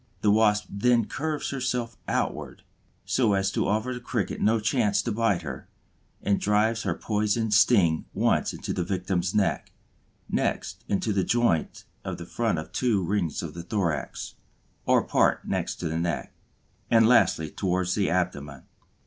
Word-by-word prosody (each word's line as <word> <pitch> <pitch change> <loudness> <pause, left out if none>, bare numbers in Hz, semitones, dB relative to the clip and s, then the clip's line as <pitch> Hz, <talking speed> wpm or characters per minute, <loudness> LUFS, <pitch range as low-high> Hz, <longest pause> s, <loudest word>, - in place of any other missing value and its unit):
The 105 - +4
Wasp 105 -1 +3
then 115 +3 +2
curves 155 +4 -3
herself 125 -4 -2
outward - - -2 0.4
so 115 -6 +2
as 95 0 +1
to - - 0
offer 110 +5 0
the 125 - -5
Cricket 120 -4 -3
no 110 +1 +3
chance 105 -1 +1
to 120 - -2
bite 105 -5 +1
her, 65 -4 -7 0.6
and 100 -1 +2
drives 110 +2 +2
her 90 -6 -1
poisoned 105 +1 0
sting 95 -7 +4
once - - +1
into - - -5
the 90 - -1
victim's 90 0 -2
neck, 105 -2 0 0.6
next - - -2
into 105 +2 0
the 95 -1 +1
joint 120 -7 0 0.2
of - - -4
the 85 - -8
front 90 -6 -2
two 115 -7 +1
rings 90 -3 -1
of - - -6
the 85 - -6
thorax, 85 -5 -3 0.5
or - - +4
part - - +1
next - - -2
the 80 -2 -2
neck, 85 0 -2 0.6
and 115 -1 +5
lastly 80 -9 +3
towards 90 -1 -1
the 100 -2 +1
abdomen. 75 -7 -2
105 Hz, 155 wpm, -26 LUFS, 90-115 Hz, 0.6 s, and